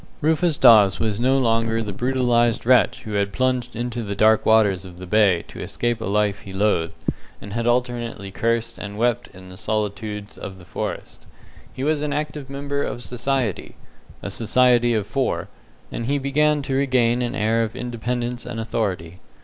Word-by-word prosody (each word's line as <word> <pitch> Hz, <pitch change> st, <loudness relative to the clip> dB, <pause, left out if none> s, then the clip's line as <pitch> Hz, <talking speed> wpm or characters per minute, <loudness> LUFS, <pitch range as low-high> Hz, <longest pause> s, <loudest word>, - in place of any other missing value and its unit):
Rufus 160 Hz, +1 st, +1 dB
Dawes 105 Hz, -6 st, +6 dB
was 110 Hz, -2 st, -1 dB
no 130 Hz, +3 st, +3 dB
longer 115 Hz, -2 st, +1 dB
the 105 Hz, -2 st, -5 dB
brutalized 120 Hz, -1 st, +1 dB
wretch 125 Hz, 0 st, +3 dB
who 110 Hz, -, -7 dB
had 100 Hz, -1 st, 0 dB
plunged 125 Hz, +1 st, -1 dB
into 120 Hz, 0 st, -3 dB
the 100 Hz, -2 st, -4 dB
dark 110 Hz, +1 st, +4 dB
waters 105 Hz, -4 st, +4 dB
of 90 Hz, -2 st, -11 dB
the 90 Hz, -, -8 dB
bay 100 Hz, -3 st, +3 dB
to -, -, -10 dB
escape 120 Hz, -1 st, -2 dB
a -, -, -3 dB
life 105 Hz, 0 st, +1 dB
he 95 Hz, -, -11 dB
loathed, 95 Hz, -4 st, 0 dB, 0.4 s
and 100 Hz, 0 st, -9 dB
had 115 Hz, +1 st, -1 dB
alternately 120 Hz, -4 st, -1 dB
cursed 115 Hz, +2 st, -1 dB
and 100 Hz, 0 st, -6 dB
wept 120 Hz, +1 st, 0 dB
in 95 Hz, 0 st, -14 dB
the 90 Hz, -, -11 dB
solitudes 105 Hz, 0 st, -3 dB
of 95 Hz, -1 st, -7 dB
the 90 Hz, -, -14 dB
forests. -, -, -6 dB, 0.4 s
He 130 Hz, -, -6 dB
was 150 Hz, 0 st, +1 dB
an 150 Hz, -1 st, -2 dB
active 150 Hz, -1 st, -4 dB
member 140 Hz, +1 st, -3 dB
of 120 Hz, -3 st, -4 dB
society 125 Hz, -3 st, -2 dB, 0.5 s
a -, -, -4 dB
society 120 Hz, +1 st, +3 dB
of 105 Hz, -2 st, 0 dB
four 130 Hz, +4 st, -2 dB, 0.4 s
and 115 Hz, -, -4 dB
he 140 Hz, +2 st, +1 dB
began 145 Hz, +2 st, +1 dB
to 135 Hz, -, -3 dB
regain 125 Hz, -3 st, +2 dB
an 120 Hz, +1 st, -2 dB
air 115 Hz, -1 st, +1 dB
of 115 Hz, -1 st, -3 dB
independence 120 Hz, 0 st, -3 dB
and 120 Hz, -2 st, -6 dB
authority. 95 Hz, -6 st, -3 dB
115 Hz, 180 wpm, -22 LUFS, 105-125 Hz, 0.5 s, Dawes